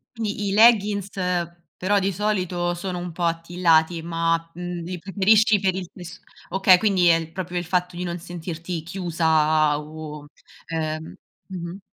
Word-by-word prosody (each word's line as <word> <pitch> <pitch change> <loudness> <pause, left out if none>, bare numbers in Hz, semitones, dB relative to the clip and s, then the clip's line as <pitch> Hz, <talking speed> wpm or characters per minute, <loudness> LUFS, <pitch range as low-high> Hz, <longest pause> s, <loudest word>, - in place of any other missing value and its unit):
Quindi 210 -2 -3
i - - -1
leggins 210 -3 +4 0.7
però 200 +3 +1
di 195 0 +1
solito 180 -3 -1
sono 180 0 -4
un 175 0 -5
po' 170 +2 -5
attillati, 165 -1 +2
ma, 165 0 -1
uhm, 175 0 -5
li 180 +1 -5
preferisci 205 +3 +3
per 190 -1 +1
il 185 -2 -5
tessu 180 -1 -10 0.3
okay, 190 -1 +5
quindi 190 -3 +2
è 170 - +7
il 165 -1 -4
proprio 180 -1 -5
il 175 - -2
fatto 180 0 -1
di 180 - -3
non 175 0 -4
sentirti 170 -1 -6
chiusa 160 -4 +1
o 150 -1 -9 0.4
ehm 155 -1 -4 0.3
mh-mh. 180 -1 -6
175 Hz, 155 wpm, -23 LUFS, 165-190 Hz, 0.7 s, è